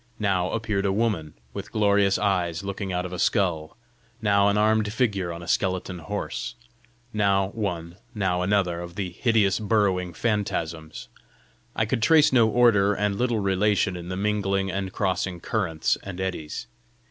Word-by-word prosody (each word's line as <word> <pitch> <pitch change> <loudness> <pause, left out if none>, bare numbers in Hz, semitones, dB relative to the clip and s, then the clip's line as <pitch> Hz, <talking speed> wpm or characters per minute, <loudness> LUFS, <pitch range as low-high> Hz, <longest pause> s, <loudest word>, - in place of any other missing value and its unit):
Now 95 -4 +1
appeared 105 -3 -1
a - - +1
woman, 100 -8 -1 0.2
with - - -7
glorious 100 -2 +3
eyes 90 -4 0
looking 100 0 -4
out 90 0 -1
of 90 - -6
a 90 - -5
skull; 85 -7 0 0.4
now 100 -2 +3
an 100 0 +2
armed 110 0 +2
figure 105 -7 0
on 85 +1 -7
a - - -10
skeleton 95 0 -1
horse; 80 - -4 0.6
now 100 -2 +2
one 90 -5 -4 0.2
now 95 -4 0
another 90 -2 +1
of 85 0 -8
the 95 -3 -3
hideous 105 0 +2
burrowing 100 -5 +1
phantasms. 85 -7 -2 0.7
I - - +1
could 115 +2 -1
trace 150 +5 +5
no 115 -3 +5
order 105 -4 +4
and 105 -1 0
little 120 0 0
relation 100 -1 +1
in 90 0 -7
the 95 - -3
mingling 100 -1 0
and 95 0 -3
crossing 95 -2 -1
currents 85 -5 -1
and 95 -2 -7
eddies. 90 -5 -4
100 Hz, 160 wpm, -25 LUFS, 90-105 Hz, 0.7 s, trace